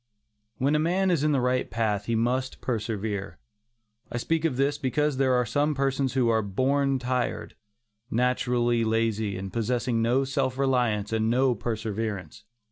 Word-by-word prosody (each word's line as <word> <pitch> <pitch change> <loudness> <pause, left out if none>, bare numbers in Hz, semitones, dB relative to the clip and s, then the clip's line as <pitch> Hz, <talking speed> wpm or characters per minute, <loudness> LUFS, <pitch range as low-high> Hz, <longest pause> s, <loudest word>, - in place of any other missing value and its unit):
When 140 +3 +1
a 150 - +3
man 180 +4 +2
is 160 -5 +1
in 150 - +3
the 140 - +2
right 125 0 0
path, 105 -3 -1
he 115 - 0
must 125 +3 -1
persevere. 105 - -3 0.7
I - - -2
speak 165 +6 0
of 140 -6 0
this 140 +2 +1
because 150 +1 0
there 130 -1 +3
are 125 0 +2
some 145 +6 0
persons 135 -1 0
who 130 -3 +2
are 110 -1 +3
"born 135 +7 +1
tired"; 125 0 -2 0.5
naturally 120 -1 +1
lazy 110 -3 0
and 95 0 -6
possessing 120 0 0
no 125 +4 +2
self 130 -1 -1
reliance 120 -6 +1
and 110 0 +1
no 130 +2 +3
perseverance. 110 -2 -4
125 Hz, 160 wpm, -26 LUFS, 110-135 Hz, 0.7 s, a